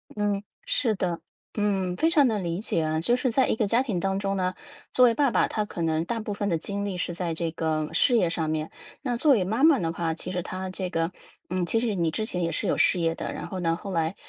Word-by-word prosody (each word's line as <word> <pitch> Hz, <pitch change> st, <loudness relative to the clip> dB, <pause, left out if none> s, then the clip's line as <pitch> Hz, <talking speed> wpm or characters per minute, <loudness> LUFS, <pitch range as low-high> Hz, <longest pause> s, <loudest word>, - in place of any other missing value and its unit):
嗯， 205 Hz, -1 st, 0 dB, 0.2 s
是 280 Hz, -, +1 dB
的。 175 Hz, -3 st, -1 dB, 0.4 s
嗯， 190 Hz, -3 st, 0 dB
非 325 Hz, -, +3 dB
常 295 Hz, -6 st, +5 dB
能 210 Hz, -5 st, 0 dB
理 170 Hz, +2 st, -2 dB
解 185 Hz, -6 st, 0 dB
啊。 155 Hz, 0 st, 0 dB
就 240 Hz, +8 st, +3 dB
是 255 Hz, -1 st, 0 dB
在 265 Hz, +3 st, +3 dB
一 -, -, +2 dB
个 215 Hz, -2 st, +1 dB
家 235 Hz, +4 st, +3 dB
庭 205 Hz, -9 st, -2 dB
当 195 Hz, +1 st, 0 dB
中 195 Hz, -1 st, -1 dB
呢， 185 Hz, 0 st, 0 dB, 0.4 s
作 250 Hz, -, +6 dB
为 235 Hz, -, +5 dB
爸 280 Hz, -1 st, +2 dB
爸， -, -, +3 dB
他 215 Hz, -1 st, -1 dB
可 175 Hz, -, -6 dB
能 160 Hz, 0 st, +1 dB
大 230 Hz, +4 st, -2 dB
部 210 Hz, -1 st, -4 dB
分 205 Hz, 0 st, -2 dB
的 165 Hz, -, +1 dB
精 200 Hz, +4 st, -3 dB
力 190 Hz, -3 st, -3 dB
是 175 Hz, -, -2 dB
在 170 Hz, -1 st, -2 dB
这 165 Hz, 0 st, -2 dB
个 155 Hz, -1 st, -1 dB
事 245 Hz, -, +4 dB
业 180 Hz, -7 st, +3 dB
上 160 Hz, -2 st, -1 dB
面。 155 Hz, 0 st, -2 dB, 0.3 s
那 245 Hz, -4 st, -1 dB
作 285 Hz, +1 st, +5 dB
为 200 Hz, -6 st, +3 dB
妈 220 Hz, +9 st, -1 dB
妈 315 Hz, -5 st, +6 dB
的 165 Hz, -1 st, -1 dB
话， 165 Hz, -1 st, -1 dB
其 180 Hz, +2 st, -4 dB
实 180 Hz, -1 st, -1 dB
她 185 Hz, +1 st, -5 dB
这 185 Hz, -1 st, -3 dB
个 165 Hz, 0 st, -1 dB, 0.4 s
嗯， 180 Hz, -1 st, 0 dB
其 225 Hz, -, +1 dB
实 225 Hz, -4 st, 0 dB
你 170 Hz, -2 st, +1 dB
之 215 Hz, +5 st, -2 dB
前 180 Hz, -5 st, -2 dB
也 165 Hz, -, 0 dB
是 -, -, -2 dB
有 -, -, +1 dB
事 180 Hz, -, +3 dB
业 165 Hz, 0 st, +1 dB
的， -, -, -4 dB
然 -, -, -6 dB
后 185 Hz, -, -5 dB
呢， 170 Hz, -2 st, 0 dB
那 -, -, +1 dB
后 195 Hz, +3 st, -7 dB
来， 165 Hz, +1 st, 0 dB
185 Hz, 300 characters per minute, -26 LUFS, 170-220 Hz, 0.4 s, 作